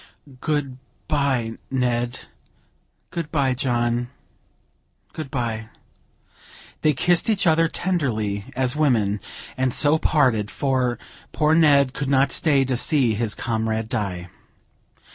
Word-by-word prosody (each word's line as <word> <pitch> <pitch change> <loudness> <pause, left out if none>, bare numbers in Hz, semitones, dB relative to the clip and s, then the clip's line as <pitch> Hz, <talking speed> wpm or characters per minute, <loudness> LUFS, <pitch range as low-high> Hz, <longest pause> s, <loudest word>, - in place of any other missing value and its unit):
"Good 140 -4 -2 0.3
bye, 135 -7 0
Ned." 120 -2 -1 0.9
"Good 165 -3 -4
bye, 140 -4 +1
John, 120 -2 0 1.0
good 155 -4 -6
bye!" 115 -5 -3 1.1
They 155 - +3
kissed 175 - +1
each 205 -3 +1
other, 165 0 +4
tenderly 115 - -1
as 130 0 0
women, 110 -9 +1 0.3
and 130 -1 0
so 150 +5 +3
parted, 125 -11 +2
for 130 -3 0 0.4
poor 155 0 +2
Ned 140 -5 +4
could 135 0 -3
not 135 0 +3
stay 140 -4 +2
to 130 -1 -1
see 125 -2 +2
his 110 0 -2
comrade 110 -1 -2
die. 90 -5 -3
130 Hz, 115 wpm, -23 LUFS, 115-150 Hz, 1.1 s, other